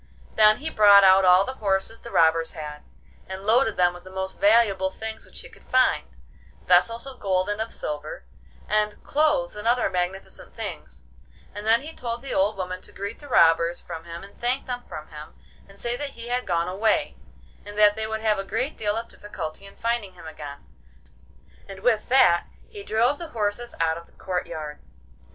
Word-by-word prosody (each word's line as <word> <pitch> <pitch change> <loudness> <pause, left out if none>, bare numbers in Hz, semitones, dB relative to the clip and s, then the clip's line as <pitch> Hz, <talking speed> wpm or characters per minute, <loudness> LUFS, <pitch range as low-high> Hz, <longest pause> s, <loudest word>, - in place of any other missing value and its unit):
Then 215 0 +6
he 315 +2 -5
brought 205 -4 +7
out 190 0 +6
all 180 +1 +6
the 260 - -4
horses 195 +2 0
the 235 - -9
robbers 165 -3 +3
had, 150 -1 -7 0.5
and 190 +1 -7
loaded 225 +2 +3
them 175 -1 +3
with 175 0 -12
the 185 - -12
most 190 0 -5
valuable 200 -3 +4
things 220 +3 -7
which - - -10
he - - -11
could 455 -2 -19
find—vessels 180 - 0
of 270 -1 -9
gold 185 -1 0
and 205 +1 -2
of 225 - -4
silver, 150 - -5 0.4
and 210 0 0
clothes 290 -4 +1
and 210 +2 -5
other 245 +1 +2
magnificent 180 +1 -4
things—and 65 - -9
then 230 +2 +5
he 315 +2 -8
told 235 -2 -5
the 275 - -4
old 195 +2 +1
woman 185 -1 -4
to - - -11
greet 200 +3 -6
the 290 - -12
robbers 165 -6 +4
from 165 -2 -8
him 170 +1 -8
and 200 - -14
thank 250 +3 0
them 245 -1 -4
from 155 0 -8
him, 150 -1 -11 0.3
and 195 0 -16
say 240 0 -2
that 275 -1 -6
he 235 +1 -7
had 250 +1 -1
gone 170 0 0
away, 205 +4 0 0.5
and 205 0 -10
that 210 -1 +6
they 220 0 -2
would 220 0 -3
have 215 -2 +1
a - - -2
great 255 +9 -2
deal 210 -1 -1
of 230 +1 -3
difficulty 200 -2 -8
in 195 - -15
finding 230 -4 -2
him 175 - -14
again, 145 -3 -9 1.0
and 195 -1 -9
with 220 -2 +1
that 175 -10 +5 0.2
he 415 - -9
drove 245 - +1
the 340 - -6
horses 210 +3 -2
out 160 0 +1
of 170 - -16
the - - -26
courtyard. 155 -5 -5
205 Hz, 195 wpm, -25 LUFS, 175-230 Hz, 1.0 s, brought